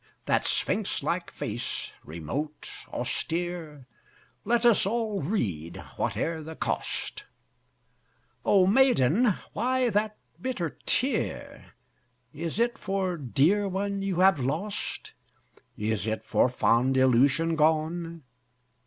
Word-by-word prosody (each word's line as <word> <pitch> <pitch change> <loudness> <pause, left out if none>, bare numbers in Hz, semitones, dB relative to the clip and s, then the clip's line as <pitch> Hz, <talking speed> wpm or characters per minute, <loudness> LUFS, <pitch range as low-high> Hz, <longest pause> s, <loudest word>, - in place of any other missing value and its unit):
That - - +2
sphinx - - 0
like - - -1
face, - - -4
remote, 110 - -5 0.2
austere, 165 -5 -3 0.6
Let 235 +2 +2
us 230 -5 +5
all 215 -3 -1
read, 95 - -2 0.2
whate'er 140 +9 -1
the 160 +1 -8
cost: - - -3 1.2
O 195 -3 +5
Maiden! 210 - +4 0.2
why 255 -1 +1
that 210 +1 0 0.2
bitter 215 -11 -2 0.2
tear? 265 +3 -1 0.6
Is 165 +3 -4
it 235 0 +1
for 190 -2 -1
dear 160 - +2
one 200 +1 -2
you 190 -2 0
have 190 -4 +5
lost? 160 +11 -3 0.6
Is 110 0 -1
it 110 0 -2
for - - +3
fond 125 +2 +2
illusion 135 +6 +4
gone? 160 +1 0
170 Hz, 105 wpm, -27 LUFS, 135-205 Hz, 1.2 s, us